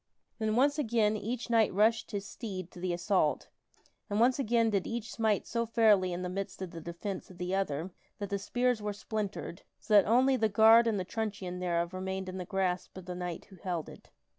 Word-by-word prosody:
Then 220 Hz, -1 st, 0 dB
once 285 Hz, +4 st, +3 dB
again 220 Hz, -5 st, +2 dB
each 235 Hz, +3 st, -4 dB
knight 225 Hz, -2 st, +4 dB
rushed 220 Hz, +3 st, +2 dB
his 200 Hz, -2 st, -4 dB
steed 185 Hz, -6 st, -6 dB
to -, -, -12 dB
the 180 Hz, 0 st, -1 dB
assault, 175 Hz, -2 st, +1 dB, 0.6 s
and 205 Hz, +1 st, 0 dB
once 250 Hz, +4 st, +4 dB
again 230 Hz, -3 st, +2 dB
did 200 Hz, -3 st, 0 dB
each 230 Hz, -1 st, -4 dB
smite 220 Hz, -3 st, +1 dB
so 235 Hz, 0 st, -2 dB
fairly 215 Hz, -5 st, +4 dB
in 175 Hz, +1 st, -3 dB
the -, -, -2 dB
midst 195 Hz, +2 st, -5 dB
of 180 Hz, -, -6 dB
the 165 Hz, -, -8 dB
defence 170 Hz, +4 st, -6 dB
of 185 Hz, -, -13 dB
the 180 Hz, +1 st, -3 dB
other 185 Hz, -2 st, -1 dB, 0.3 s
that 205 Hz, -2 st, -5 dB
the 200 Hz, -, 0 dB
spears 245 Hz, +3 st, 0 dB
were 210 Hz, 0 st, -2 dB
splintered, 205 Hz, -3 st, -4 dB, 0.2 s
so 215 Hz, -, -4 dB
that 205 Hz, -2 st, +7 dB
only 260 Hz, +4 st, +4 dB
the 220 Hz, -3 st, +2 dB
guard 225 Hz, +3 st, +7 dB
and 215 Hz, -3 st, +1 dB
the 185 Hz, -, -3 dB
truncheon 200 Hz, -4 st, -4 dB
thereof 170 Hz, -1 st, -1 dB
remained 190 Hz, 0 st, -4 dB
in 185 Hz, 0 st, -6 dB
the 180 Hz, -, -4 dB
grasp 185 Hz, -1 st, -2 dB
of 185 Hz, -, -9 dB
the 180 Hz, -, -5 dB
knight 180 Hz, -1 st, -5 dB
who 190 Hz, -, -13 dB
held 175 Hz, -3 st, -3 dB
it. -, -, -14 dB
200 Hz, 215 wpm, -31 LUFS, 185-225 Hz, 0.6 s, that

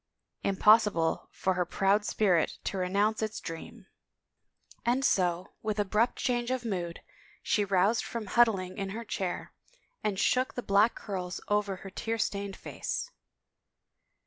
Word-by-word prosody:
Impossible 200 Hz, -4 st, +4 dB
for 190 Hz, -, 0 dB
her 180 Hz, 0 st, +1 dB
proud 195 Hz, +4 st, +2 dB
spirit 185 Hz, -6 st, +2 dB
to -, -, -3 dB
re 180 Hz, 0 st, -1 dB
nounce 210 Hz, +3 st, +1 dB
its 220 Hz, 0 st, -2 dB
dream! 165 Hz, -1 st, -8 dB, 1.0 s
And 255 Hz, +3 st, +2 dB
so, 180 Hz, -1 st, +1 dB
with 215 Hz, -1 st, -2 dB
abrupt 210 Hz, +3 st, +2 dB
change 240 Hz, -1 st, 0 dB
of 255 Hz, -1 st, -2 dB
mood, 175 Hz, -6 st, -3 dB, 0.4 s
she 210 Hz, -, +2 dB
roused 200 Hz, +3 st, +2 dB
from 230 Hz, -2 st, -5 dB
huddling 200 Hz, -3 st, +2 dB
in 195 Hz, -1 st, -2 dB
her 230 Hz, -, -6 dB
chair, 190 Hz, -4 st, -3 dB, 0.5 s
and 210 Hz, -2 st, 0 dB
shook 255 Hz, +3 st, +2 dB
the 245 Hz, -, -3 dB
black 205 Hz, +4 st, +4 dB
curls 185 Hz, -3 st, -4 dB
over 205 Hz, -1 st, +1 dB
her 190 Hz, +1 st, -10 dB
tear 225 Hz, +3 st, -2 dB
stained 200 Hz, -2 st, -2 dB
face. -, -, -4 dB
200 Hz, 145 wpm, -30 LUFS, 185-225 Hz, 1.0 s, Impossible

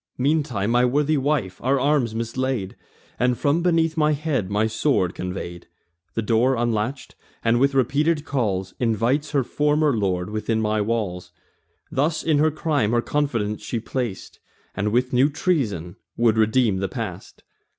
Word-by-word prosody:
Meantime 130 Hz, -7 st, 0 dB
my 120 Hz, +1 st, +4 dB
worthy 145 Hz, +5 st, +2 dB
wife 135 Hz, -10 st, -1 dB
our 135 Hz, +2 st, +2 dB
arms 135 Hz, -5 st, +1 dB
mislaid, 115 Hz, -3 st, -2 dB, 0.4 s
And 125 Hz, 0 st, +2 dB
from 150 Hz, +4 st, +1 dB
beneath 165 Hz, -2 st, +2 dB
my 155 Hz, -1 st, +3 dB
head 140 Hz, -, -1 dB
my 105 Hz, +2 st, +1 dB
sword 110 Hz, -, +1 dB
convey'd; 90 Hz, -1 st, -6 dB, 0.5 s
The 115 Hz, -, -1 dB
door 115 Hz, +5 st, +2 dB
unlatch'd, 120 Hz, +2 st, -2 dB, 0.3 s
and, 115 Hz, +1 st, +3 dB
with 140 Hz, +1 st, +2 dB
repeated 145 Hz, +5 st, +1 dB
calls, 100 Hz, -10 st, -1 dB
Invites 120 Hz, +5 st, +1 dB
her 140 Hz, -3 st, +1 dB
former 150 Hz, +1 st, +1 dB
lord 95 Hz, -3 st, -1 dB
within 110 Hz, +1 st, -1 dB
my 110 Hz, -1 st, +1 dB
walls. 100 Hz, -5 st, -2 dB, 0.6 s
Thus 150 Hz, +4 st, 0 dB
in 155 Hz, -3 st, +2 dB
her 155 Hz, +1 st, +4 dB
crime 150 Hz, -7 st, 0 dB
her 120 Hz, -, +3 dB
confidence 115 Hz, -9 st, -1 dB
she 115 Hz, -, -3 dB
plac'd, 115 Hz, -3 st, -5 dB, 0.3 s
And 105 Hz, +2 st, -1 dB
with 125 Hz, +3 st, +1 dB
new 130 Hz, +4 st, +4 dB
treasons 115 Hz, -, -1 dB, 0.2 s
would 115 Hz, -2 st, +3 dB
redeem 110 Hz, -1 st, +2 dB
the 95 Hz, 0 st, -2 dB
past. -, -, -7 dB
120 Hz, 150 wpm, -23 LUFS, 105-145 Hz, 0.6 s, my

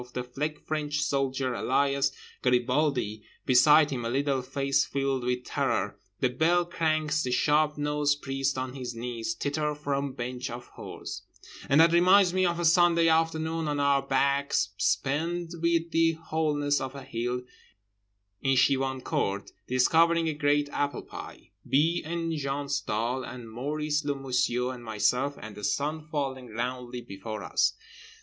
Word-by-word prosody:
The 125 Hz, -, -3 dB
Fake 150 Hz, +5 st, -4 dB
French 150 Hz, -1 st, -2 dB
Soldier, 135 Hz, -2 st, 0 dB
alias 140 Hz, +2 st, +1 dB, 0.3 s
Garibaldi, 125 Hz, -3 st, +1 dB, 0.2 s
beside 145 Hz, +4 st, +6 dB
him, 125 Hz, -3 st, -3 dB
a 115 Hz, -, -2 dB
little 135 Hz, +1 st, 0 dB
face 135 Hz, +2 st, +1 dB
filled 135 Hz, -2 st, -1 dB
with 125 Hz, 0 st, -1 dB
terror… 115 Hz, -8 st, -1 dB, 0.2 s
the 130 Hz, -, +3 dB
Bell 170 Hz, +7 st, +2 dB
cranks 155 Hz, -2 st, 0 dB
the 130 Hz, -, -2 dB
sharp 150 Hz, +4 st, +2 dB
nosed 145 Hz, 0 st, 0 dB
priest 135 Hz, 0 st, -1 dB
on 130 Hz, 0 st, -3 dB
his 125 Hz, -3 st, -6 dB
knees… 120 Hz, +6 st, -4 dB
titter 150 Hz, 0 st, -1 dB
from 140 Hz, -2 st, -2 dB
bench 125 Hz, +1 st, -4 dB
of 120 Hz, +1 st, -8 dB
whores— -, -, -8 dB, 0.5 s
And 140 Hz, -, +5 dB
that 165 Hz, +1 st, +7 dB
reminds 180 Hz, +1 st, +5 dB
me 185 Hz, -1 st, +3 dB
of 170 Hz, 0 st, -1 dB
a 175 Hz, -, 0 dB
Sunday 170 Hz, 0 st, +5 dB
afternoon 160 Hz, 0 st, +1 dB
on 145 Hz, -1 st, -1 dB
our 140 Hz, -1 st, +3 dB
backs 140 Hz, -5 st, +1 dB
spent 155 Hz, -, -1 dB
with 170 Hz, 0 st, +1 dB
the 165 Hz, 0 st, +3 dB
wholeness 150 Hz, -3 st, 0 dB
of 130 Hz, +1 st, -5 dB
a 140 Hz, -, -8 dB
hill 125 Hz, 0 st, -3 dB, 1.0 s
in 135 Hz, -1 st, +2 dB
Chevancourt, 130 Hz, -7 st, 0 dB, 0.2 s
discovering 165 Hz, +6 st, +3 dB
a 160 Hz, -, 0 dB
great 145 Hz, 0 st, +1 dB
apple 145 Hz, 0 st, -1 dB
pie, -, -, -10 dB, 0.2 s
B. 160 Hz, +5 st, +3 dB
and 165 Hz, 0 st, -2 dB
Jean 140 Hz, -1 st, -3 dB
Stahl 125 Hz, -2 st, -1 dB
and 120 Hz, -3 st, -8 dB
Maurice 150 Hz, +5 st, -2 dB
le 145 Hz, -1 st, -1 dB
Menusier 125 Hz, -2 st, 0 dB
and 125 Hz, -1 st, -10 dB
myself; 125 Hz, +6 st, 0 dB
and 110 Hz, -1 st, -8 dB
the 105 Hz, 0 st, -10 dB
sun 150 Hz, +7 st, -1 dB
falling 135 Hz, -4 st, -3 dB
roundly 125 Hz, +2 st, -4 dB
before 105 Hz, 0 st, -7 dB
us. -, -, +2 dB
140 Hz, 150 wpm, -28 LUFS, 125-155 Hz, 1.0 s, that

